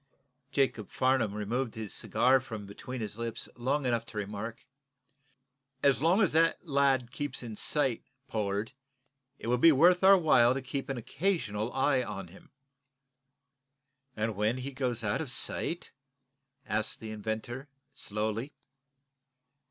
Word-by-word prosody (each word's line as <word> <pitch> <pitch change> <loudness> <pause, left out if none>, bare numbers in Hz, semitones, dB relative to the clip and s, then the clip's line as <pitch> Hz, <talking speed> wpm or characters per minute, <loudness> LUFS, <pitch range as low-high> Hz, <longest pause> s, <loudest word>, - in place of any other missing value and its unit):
Jacob 135 -7 0
Farnum 130 -5 +1
removed 115 +4 -2
his 110 -3 -5
cigar 125 +4 +3
from 110 -5 -7
between 125 +5 -7
his 105 +1 -5
lips 115 -1 -4
long 135 +4 0
enough 120 -2 +1
to 115 - -11
remark: 105 +3 -5 1.2
"As 140 -1 +4
long 180 +7 +4
as 190 - +2
the 165 +1 +4
lad 135 -5 +2
keeps 140 -2 -4
in 115 -3 -6
sight, 135 -1 +1 0.3
Pollard, 105 +1 -2 0.6
it - - -10
will 120 +1 +1
be 165 +5 +8
worth 175 +6 +5
our 195 +1 +9
while 130 -8 +5
to 135 - -2
keep 135 +1 -4
an 135 - -2
occasional 120 - -1
eye 135 0 +2
on 100 -6 -6
him." 95 - -16 1.7
"And 110 0 -1
when 105 +5 +1
he 130 +2 -4
goes 125 -3 -2
out 105 +7 0
of 155 - -4
sight? 170 +6 -2 0.7
asked 110 +1 -1
the 110 -1 -7
inventor, 110 +5 -4 0.2
slowly. 110 +3 -3
120 Hz, 140 wpm, -30 LUFS, 110-135 Hz, 1.7 s, our